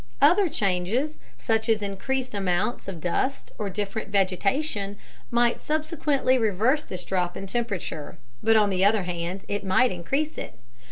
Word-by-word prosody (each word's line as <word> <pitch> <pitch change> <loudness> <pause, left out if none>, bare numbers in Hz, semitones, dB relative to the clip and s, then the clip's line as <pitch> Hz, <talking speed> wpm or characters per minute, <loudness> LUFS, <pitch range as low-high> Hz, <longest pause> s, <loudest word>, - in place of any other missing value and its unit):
Other 355 +6 +5
changes, 210 +8 0 0.2
such 225 0 0
as 215 -2 +3
increased 255 +6 -2
amounts 195 +3 0
of 190 -4 -5
dust 180 - -1
or 205 -2 -1
different 205 +3 -3
vegetation, 200 - 0 0.3
might 235 0 +2
subsequently 300 -4 +1
reverse 225 +7 +2
this 180 -1 -6
drop 180 -2 -1
in 195 - -5
temperature 195 -8 -3 0.2
but 225 0 +4
on 210 -2 +4
the 185 0 +1
other 205 0 +4
hand, 180 +1 -4
it 205 0 -2
might 220 +7 +3
increase 275 - -2
it. - - -7
205 Hz, 150 wpm, -26 LUFS, 190-255 Hz, 0.3 s, Other